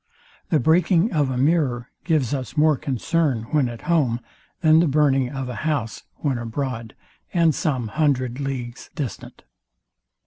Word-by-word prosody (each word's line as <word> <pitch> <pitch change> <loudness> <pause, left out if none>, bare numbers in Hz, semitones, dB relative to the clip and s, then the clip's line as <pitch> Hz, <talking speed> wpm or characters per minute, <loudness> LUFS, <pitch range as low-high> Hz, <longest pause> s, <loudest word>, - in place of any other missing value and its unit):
The 155 - +3
breaking 170 - +3
of 145 -4 +2
a 130 - -2
mirror 135 -4 +1
gives 150 -7 +1
us 130 0 -4
more 155 0 +5
concern 140 -2 0
when 145 -5 +2
at 115 -2 -8
home, 140 -9 +1 0.4
than 160 -1 +6
the 170 - +3
burning 135 -3 +2
of 135 -1 -4
a 125 - -4
house, 145 -8 -2
when 135 -5 -1
abroad, 115 -1 -4 0.4
and 165 -2 +4
some 130 -6 -1
hundred 130 -2 0
leagues 130 -3 -5
distant. 135 -9 -6
140 Hz, 145 wpm, -23 LUFS, 125-155 Hz, 0.4 s, than